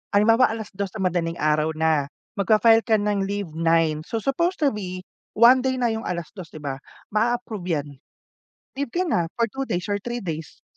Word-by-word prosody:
halimbawa 225 +4 +5
2:00 205 -3 -5
ng 195 - -2
madaling 165 -1 -1
araw 155 +1 +1
na. 155 -3 +1 0.3
Magfa-file 225 +3 +4
ka 220 - +4
ng 205 -2 0
leave 200 -4 -3
9. 165 -1 +2
So, 225 -2 -3
supposed 340 +5 0
to 280 - +4
be, 185 -3 -6 0.3
one 240 +3 +7
day 260 0 0
na 245 -2 +1
yung 220 0 -4
2:00, 175 +1 -5
'di 155 - -9
ba? 135 -2 -4 0.3
Maa-approve 220 -3 -1 0.2
yan. 145 - -13 0.9
Leave 280 - 0
kana 325 - +1
for 230 -2 0
2 270 0 -4
days 180 +4 -2
or 205 - 0
3 240 +1 -5
days. 160 -3 -6
205 Hz, 180 wpm, -24 LUFS, 165-235 Hz, 0.9 s, one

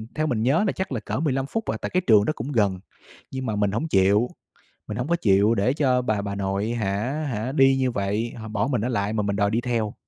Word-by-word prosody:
theo 155 0 0
mình 115 -4 0
nhớ 145 - +3
là - - +2
chắc 190 -5 -4
là 120 - -1
cỡ - - -4
15 135 -4 0
phút 225 +8 -3
à, - - -2
tại - - -3
cái 185 - +1
trường 105 -2 +6
đó 155 - 0
cũng 130 +6 -5
gần. 100 -6 +1 0.5
Nhưng 130 -1 -4
mà 110 - -2
mình 105 -1 +1
hổng 135 +10 -2
chịu, 100 +2 +3 0.6
mình 105 0 -5
hổng 125 +3 -2
có 170 - +2
chịu 105 - +3
để 110 +6 +2
cho 130 -4 +2
bà 110 -4 -1
bà 100 0 -4
nội 100 +3 -1
hả 120 +7 -2
hả 115 +4 -3
đi 135 -2 +4
như 130 -2 +1
vậy, 105 +3 -2
h - - -6
bỏ 105 +4 -1
mình 125 -6 0
ở - - -1
lại 105 -2 -1
mà 105 -2 0
mình 100 0 -1
đòi 100 0 +1
đi 115 +2 +1
theo. 115 -4 -1
115 Hz, 270 wpm, -24 LUFS, 100-135 Hz, 0.6 s, trường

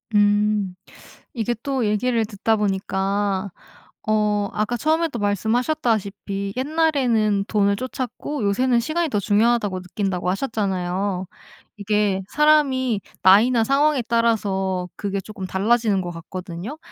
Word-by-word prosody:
음. 205 -2 +2 0.6
이게 235 -1 -1
또 265 -5 -1
얘기를 225 +2 +1
듣다 215 +1 0
보니까 195 0 -1 0.6
어 210 -1 +1
아까 215 +3 -1
처음에도 315 -2 0
말씀하셨다시피 205 - -1
옛날에는 255 -8 +1
돈을 200 -1 +2
좇았고 255 +3 -4
요새는 235 +5 +2
'시간이 315 +6 -1
더 210 - 0
중요하다.'고 205 -1 +1
느낀다고 185 -1 -2
하셨잖아요. 190 -3 -2 0.5
이게 205 -1 0
사람이 270 -7 +3 0.2
나이나 225 +6 +5
상황에 280 +3 +2
따라서 200 -6 0
그게 200 -1 -3
쪼끔 195 -1 -7
달라지는 210 +1 +1
것 175 -1 -5
같거든요. 175 - -7
210 Hz, 295 characters per minute, -22 LUFS, 195-245 Hz, 0.6 s, 나이나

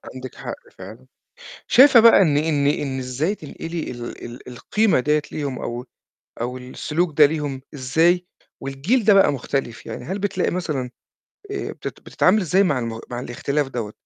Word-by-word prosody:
عندِك 130 0 -8
حق - - -6 0.2
فعلًا. - - -12 0.6
شايفة 265 -2 +8
بقى 230 -3 +7
إن 150 -6 +3
إن 150 -2 +1
إن 140 -2 0
إزاي 130 +10 -1
تنقلي 165 0 -6
ال 120 -1 -7
ال 120 +2 -10
القيمة 195 - +1
ديّة 150 +3 +1
ليهم 140 -4 -3
أو 120 +2 -5 0.6
أو 125 +2 -3
السلوك 150 +5 -3
ده 150 - +10
ليهم 145 -3 -2
إزاي 165 +7 +2 0.4
والجيل 150 - 0
ده 210 - +7
بقى 195 -7 +5
مختلف؟ 125 -3 -3
يعني - - -7
هل 190 +4 -3
بتلاقي 195 -2 -1
مثلًا 155 -8 -2 0.6
آآ 405 - -4
بت - - -12
بتتعاملي 200 +2 +2
إزاي 185 +4 +3
مع 150 -9 +1
المغ 115 -2 -4
مع 120 0 -4
الاختلاف 140 +3 -2
دوّة؟ 115 -5 -5
145 Hz, 160 wpm, -22 LUFS, 130-180 Hz, 0.6 s, ده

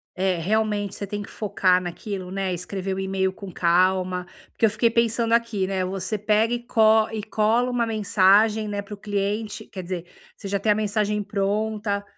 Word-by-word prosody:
eh, 185 -1 +1
realmente, 205 +2 0
você 200 - -5
tem 205 +1 -4
que - - -9
focar 185 -3 +2
naquilo, 185 +1 -5
né, 195 -1 -2
escrever 190 +2 -4
o - - -4
email 190 0 -1
com 195 0 -9
calma, 180 +1 +2 0.3
porque - - +1
eu - - +4
fiquei 225 +3 +2
pensando 230 0 +1
aqui, 230 -4 +1
né, 190 -1 -1
você 190 +3 -3
pega 215 +3 +2
e 240 - -1
co 220 -1 +4
e 220 -2 -4
cola 225 +3 +1
uma 240 -1 +1
mensagem, 215 0 +3
né, 205 -1 -3
pro 205 +1 -8
cliente, 205 +1 -3
quer 185 - -6
dizer, 175 -1 -5 0.3
você 200 - -8
já 200 0 -1
tem 215 - +2
a - - +4
mensagem 210 0 0
pronta, 205 0 -1
205 Hz, 185 wpm, -24 LUFS, 190-215 Hz, 0.3 s, eu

